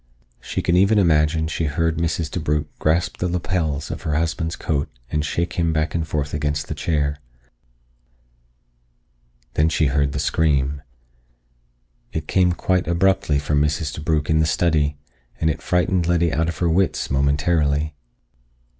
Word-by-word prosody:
She -, -, -4 dB
could 85 Hz, -, +2 dB
even 100 Hz, +4 st, +4 dB
imagine 80 Hz, -3 st, +3 dB
she 80 Hz, +1 st, -2 dB
heard 80 Hz, +2 st, 0 dB
Mrs. 80 Hz, -1 st, -1 dB
DeBrugh 75 Hz, -3 st, -1 dB
grasp 80 Hz, +3 st, +1 dB
the 90 Hz, -, -1 dB
lapels 85 Hz, -4 st, -2 dB
of -, -, -5 dB
her 80 Hz, -3 st, -1 dB
husband's 80 Hz, +1 st, -1 dB
coat 75 Hz, -3 st, -2 dB, 0.2 s
and 75 Hz, -1 st, 0 dB
shake 85 Hz, +3 st, -2 dB
him 85 Hz, -1 st, +2 dB
back 80 Hz, 0 st, 0 dB
and 80 Hz, -1 st, -1 dB
forth 75 Hz, -1 st, -2 dB
against 75 Hz, 0 st, -1 dB
the -, -, -3 dB
chair. 75 Hz, -2 st, -1 dB, 2.4 s
Then 80 Hz, +2 st, +3 dB
she 80 Hz, -, +1 dB
heard 70 Hz, -1 st, +1 dB
the -, -, -2 dB
scream. 70 Hz, -2 st, +1 dB, 1.3 s
It 80 Hz, -1 st, -4 dB
came 90 Hz, -2 st, +3 dB
quite 90 Hz, 0 st, 0 dB
abruptly 85 Hz, -3 st, +2 dB
from 75 Hz, +1 st, +1 dB
Mrs. 75 Hz, 0 st, -1 dB
DeBrugh 75 Hz, -1 st, -1 dB
in 80 Hz, 0 st, +2 dB
the 80 Hz, -, +3 dB
study, 75 Hz, -2 st, +1 dB, 0.4 s
and 80 Hz, 0 st, +2 dB
it -, -, -6 dB
frightened 90 Hz, -1 st, +1 dB
Letty 85 Hz, -2 st, +2 dB
out 80 Hz, +3 st, +1 dB
of 85 Hz, -, -5 dB
her 85 Hz, -, +1 dB
wits 95 Hz, +2 st, 0 dB
momentarily. 70 Hz, +2 st, +1 dB
80 Hz, 155 wpm, -22 LUFS, 75-85 Hz, 2.4 s, even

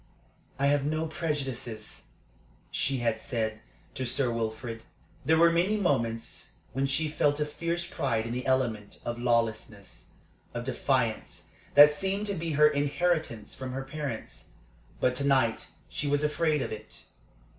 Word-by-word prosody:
"I 140 Hz, -, +1 dB
have 145 Hz, 0 st, +3 dB
no 155 Hz, +2 st, 0 dB
prejudices," 135 Hz, -9 st, -4 dB, 0.7 s
she 135 Hz, 0 st, +1 dB
had 110 Hz, -1 st, +1 dB
said 110 Hz, -2 st, -2 dB, 0.3 s
to 130 Hz, -, -3 dB
Sir 130 Hz, 0 st, +1 dB
Wilfrid. 115 Hz, 0 st, -3 dB, 0.4 s
There 160 Hz, +1 st, +4 dB
were 170 Hz, +1 st, +6 dB
many 180 Hz, +6 st, +2 dB
moments 115 Hz, -, -1 dB, 0.2 s
when 135 Hz, +2 st, +1 dB
she 155 Hz, +4 st, +2 dB
felt 150 Hz, -1 st, +1 dB
a 150 Hz, -, +2 dB
fierce 170 Hz, +3 st, -2 dB
pride 120 Hz, -9 st, -1 dB
in 115 Hz, -, -3 dB
the 125 Hz, +1 st, -3 dB
element 120 Hz, -6 st, 0 dB
of 120 Hz, 0 st, -3 dB
lawlessness, 115 Hz, -4 st, -1 dB, 0.5 s
of -, -, -2 dB
defiance, -, -, -1 dB, 0.2 s
that 145 Hz, +1 st, +10 dB
seemed 195 Hz, +7 st, -1 dB
to 200 Hz, -, -1 dB
be 165 Hz, -3 st, -2 dB
her 150 Hz, +1 st, +6 dB
inheritance 145 Hz, -, 0 dB
from 130 Hz, -1 st, -6 dB
her 135 Hz, +1 st, -3 dB
parents. 135 Hz, -4 st, -6 dB, 0.5 s
But 125 Hz, 0 st, +2 dB
to 140 Hz, -, 0 dB
night 130 Hz, -5 st, +2 dB, 0.2 s
she 145 Hz, -, -3 dB
was 145 Hz, +1 st, +1 dB
afraid 150 Hz, -1 st, +1 dB
of -, -, -5 dB
it. 110 Hz, -, -8 dB
135 Hz, 150 wpm, -29 LUFS, 115-155 Hz, 0.7 s, that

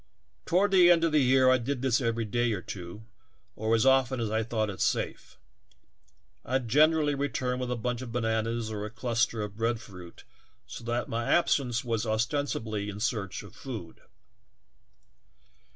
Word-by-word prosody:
Toward 190 Hz, +3 st, +3 dB
the 180 Hz, -2 st, +6 dB
end 170 Hz, -1 st, +5 dB
of 165 Hz, -, +2 dB
the 150 Hz, -1 st, +4 dB
year 130 Hz, 0 st, +5 dB
I 130 Hz, -, +4 dB
did 130 Hz, +2 st, -3 dB
this 130 Hz, -1 st, +2 dB
every 115 Hz, -1 st, -1 dB
day 120 Hz, +2 st, 0 dB
or 95 Hz, -, -3 dB
two 90 Hz, +3 st, -8 dB, 0.5 s
or 110 Hz, +1 st, +1 dB
as 115 Hz, -, +2 dB
often 130 Hz, -1 st, +3 dB
as 110 Hz, -2 st, -2 dB
I 110 Hz, +1 st, +1 dB
thought 110 Hz, -2 st, -1 dB
it 95 Hz, -, -8 dB
safe; -, -, -2 dB, 1.1 s
I 130 Hz, -, 0 dB
generally 150 Hz, +5 st, +3 dB
returned 130 Hz, -2 st, -2 dB
with 125 Hz, -1 st, -3 dB
a 125 Hz, -, -1 dB
bunch 125 Hz, +1 st, -3 dB
of 125 Hz, -3 st, -7 dB
bananas 115 Hz, -1 st, -1 dB
or 105 Hz, -1 st, -4 dB
a 105 Hz, -, -4 dB
cluster 115 Hz, -1 st, -1 dB
of 105 Hz, 0 st, -7 dB
bread 115 Hz, 0 st, 0 dB
fruit 90 Hz, -7 st, -12 dB, 0.4 s
so -, -, -9 dB
that 120 Hz, +1 st, -1 dB
my 115 Hz, +1 st, -2 dB
absence 135 Hz, -8 st, +2 dB
was 115 Hz, -1 st, -1 dB
ostensibly 110 Hz, -2 st, -1 dB
in 105 Hz, 0 st, -7 dB
search 105 Hz, -4 st, -2 dB
of -, -, -13 dB
food. 110 Hz, -11 st, -8 dB
120 Hz, 170 wpm, -28 LUFS, 110-130 Hz, 1.1 s, the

